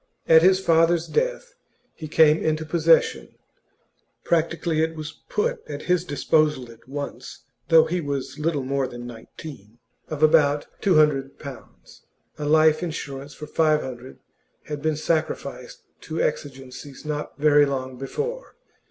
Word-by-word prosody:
At 160 0 +7
his 185 +2 +5
father's 165 -1 +3
death - - -2 0.4
he 155 - -8
came 155 0 +5
into 155 0 0
possession 165 0 +2 0.9
(practically 165 -1 0
it 160 0 -1
was 155 -1 -6 0.2
put 470 +2 -1
at - - -6
his 180 -1 +1
disposal 150 -4 +1
at 115 +1 -19
once, 140 -2 -7 0.3
though 160 -1 +7
he 180 +1 -2
was 140 -1 -4
little 150 -3 0
more 135 0 -1
than 120 0 -9
nineteen) 115 -1 -11 0.3
of 155 -1 -3
about 150 -2 +4 0.2
two 190 -4 +3
hundred 145 -3 +2
pounds 140 -4 -12 0.4
a 150 - -3
life 155 0 +4
insurance 145 -4 -6
for 150 - -8
five 155 0 +2
hundred 130 0 -8 0.5
had 150 -1 -6
been 155 0 0
sacrificed 165 - -3 0.2
to 160 0 -5
exigencies 135 -1 -4
not 150 -1 -4
very 145 0 +5
long 130 -2 -4
before. 475 - -5
155 Hz, 140 wpm, -24 LUFS, 140-165 Hz, 0.9 s, At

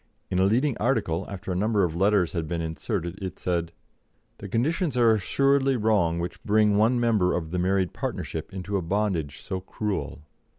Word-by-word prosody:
In 90 - +1
a 95 - +4
leading 125 +6 +2
article, 100 -8 0
after 95 -1 -6
a - - -1
number 105 +1 +2
of 85 -2 -1
letters 95 -1 +3
had 85 -3 -3
been 85 +1 -2
inserted, 85 +3 -3
it 95 -1 -5
said: 85 -2 -1 0.7
"The 100 - -7
conditions 150 - 0
are 115 -2 +5
assuredly 135 +6 +2
wrong 105 -7 +2
which 85 +1 -5
bring 105 -1 +3
one 115 +4 +3
member 110 -6 +2
of 80 -2 -3
the 90 - -1
married 95 0 +1
partnership 80 - -4
into 95 +1 -3
a - - -1
bondage 85 -5 -1
so 95 - -4
cruel. 100 -4 -4
100 Hz, 180 wpm, -26 LUFS, 90-110 Hz, 0.7 s, are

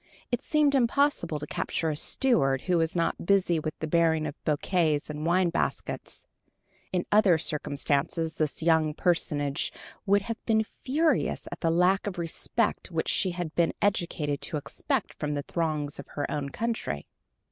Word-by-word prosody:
It 245 - 0
seemed 300 -2 +2
impossible 255 - +2
to 150 - -5
capture 160 +2 -2
a - - -3
steward 145 - +2
who 180 -2 +1
was 165 +1 0
not 165 -1 0
busy 190 -4 +3
with 155 0 -4
the - - -3
bearing 160 -1 +2
of - - -3
bouquets 155 -1 +1
and 150 +2 -4
wine 175 0 +3
baskets. - - -3 0.7
In 180 -1 0
other 205 -5 +5
circumstances 150 +1 -1
this 155 0 0
young 160 -2 +3
personage 150 -6 0 0.4
would 200 0 +4
have 230 +2 -5
been 220 -1 +3 0.2
furious 310 +5 +1
at - - -6
the 165 - +1
lack 180 +4 +3
of 195 - -4
respect 165 -1 -1
which - - -1
she 190 - +2
had 175 -3 -4
been 170 -1 +2
educated 170 -7 0
to 155 - -3
expect 145 - -2
from 150 0 -1
the 145 - -2
throngs 155 -4 -2
of 140 - -8
her 145 - -3
own 145 -2 -2
country. 220 - -3
165 Hz, 165 wpm, -28 LUFS, 150-195 Hz, 0.7 s, other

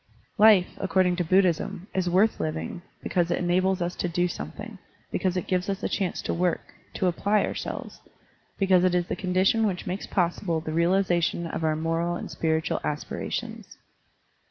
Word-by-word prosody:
Life, 210 -4 +6
according 185 -2 +2
to 180 - +1
Buddhism, 185 +1 +1
is 185 -2 0
worth 195 +5 +3
living, 155 +2 -3 0.2
because 175 -1 0
it - - +1
enables 185 +1 +1
us 175 +1 -3
to 175 - -1
do 175 +2 +1
something, - - -7 0.3
because 185 -2 0
it 180 - -2
gives 180 +1 -1
us 195 +1 -3
a - - +1
chance 190 -3 -2
to - - -1
work, 175 0 -1 0.2
to - - 0
apply 200 +4 +2
ourselves, - - -6 0.6
because 190 -2 +4
it 180 -1 +3
is 175 -1 +1
the - - -3
condition 190 +4 +2
which 185 -3 -3
makes 185 +3 -4
possible 175 -2 0
the 155 0 -5
realization 170 0 +2
of 165 - -4
our 155 -1 +2
moral 165 +2 -1
and - - -6
spiritual 160 -1 0
aspira 150 0 -4
tions. - - -5
180 Hz, 175 wpm, -26 LUFS, 170-190 Hz, 0.6 s, Life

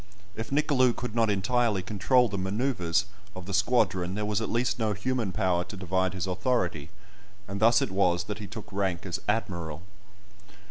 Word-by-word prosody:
If 110 - -5
Nicolou 135 -4 +3
could 120 -3 -5
not 115 -2 +2
entirely 105 0 +1
control 110 +6 +3
the 100 -3 -4
manoeuvres 100 -2 0 0.3
of 90 -1 -7
the 100 - -5
squadron, 95 -4 +2
there 105 0 -2
was 105 +1 0
at - - -2
least 120 +1 0
no 110 -2 +1
human 115 0 -1
power 90 -1 +1
to 100 - -9
divide 95 +1 0
his 95 - -2
authority, 90 - -1 0.6
and 100 +1 -4
thus 115 +2 +5
it - - -3
was 90 -2 +2
that 105 +3 -5
he 105 - -6
took 110 0 -9
rank 95 -3 -1
as 90 -2 -3
"Admiral." 85 -7 -2
100 Hz, 180 wpm, -28 LUFS, 95-115 Hz, 0.6 s, thus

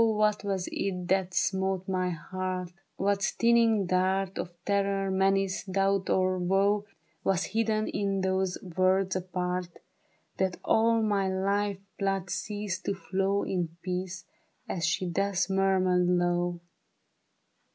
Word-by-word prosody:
what 215 -2 +2
was 195 -3 -2
it 180 -2 -2
that 190 -1 +2
smote 190 0 0
my 185 -1 0
heart? 185 +1 -4 0.3
Whjct 200 0 +1
stinging 230 -1 +3
dart 185 +1 +1
Of - - -3 0.2
terror, 195 -1 +1
menace, 195 0 +1
doubt 195 0 +1
or 185 0 +2
woe 200 +3 +2 0.4
Was 190 -1 +1
hidden 220 -1 0
in 195 -1 -1
those 190 -1 0
words 185 +1 +1
apart, 180 -1 -2 0.7
That 190 -1 0
all 225 0 +3
my 200 -3 +1
life 200 +1 0 0.2
blood 195 -2 -1
ceased 205 0 -3
to 200 - 0
flow 195 +1 0
In 170 -3 -2
peace, 185 +1 -4 0.4
as 165 -3 -1
she 180 +2 0
thus 195 +1 0
murmured 185 -2 +3
low 175 -1 +1
190 Hz, 125 wpm, -29 LUFS, 185-200 Hz, 0.7 s, stinging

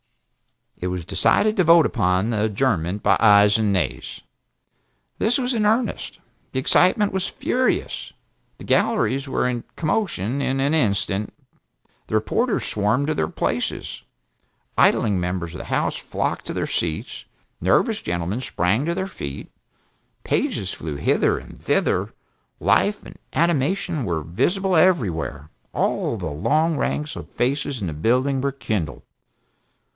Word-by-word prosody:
It 90 - -3
was 90 -2 -3
decided 215 - +2
to 185 - +4
vote 165 -1 +6
upon 95 0 +1
the 110 -1 +1
adjournment 100 -4 0
by 100 - +4
ayes 105 -1 +6
and 105 -2 +2
nays. 70 -9 -2 1.0
This 225 +3 +2
was 255 -1 0
in 220 -3 +1
earnest. 225 +2 0 0.3
The 130 - 0
excitement 185 +9 +3
was 190 -1 -1
furious. 255 0 -1 0.5
The - - -11
galleries 200 - +1
were 130 - 0
in 120 -2 -2
commotion 155 - -1
in 135 0 0
an 140 +3 +1
instant, 105 -6 0 0.7
the - - -2
reporters 230 - 0
swarmed 110 +7 +1
to 155 - +1
their 80 - 0
places. - - -3 0.7
Idling 100 -4 +3
members 90 -1 -3
of - - -7
the - - -7
House - - -1
flocked - - -3
to - - -3
their - - -1
seats, 80 -2 -3 0.4
nervous - - +2
gentlemen 85 +7 -2
sprang 110 -1 0
to 170 +1 -1
their 190 +1 -1
feet, 70 - -7 0.7
pages - - -1
flew 75 -2 -5
hither 70 - +2
and - - -11
thither, - - +1 0.5
life 110 - +2
and - - -12
animation 170 0 +1
were 85 -6 -2
visible 175 - 0
everywhere, 90 - +1 0.2
all 115 - 0
the 90 - -5
long 130 - +1
ranks 150 +1 -2
of - - -8
faces 135 0 -1
in - - -2
the 80 - -3
building 130 - +1
were 140 +1 0
kindled. 100 - -3
120 Hz, 140 wpm, -22 LUFS, -, 1.0 s, vote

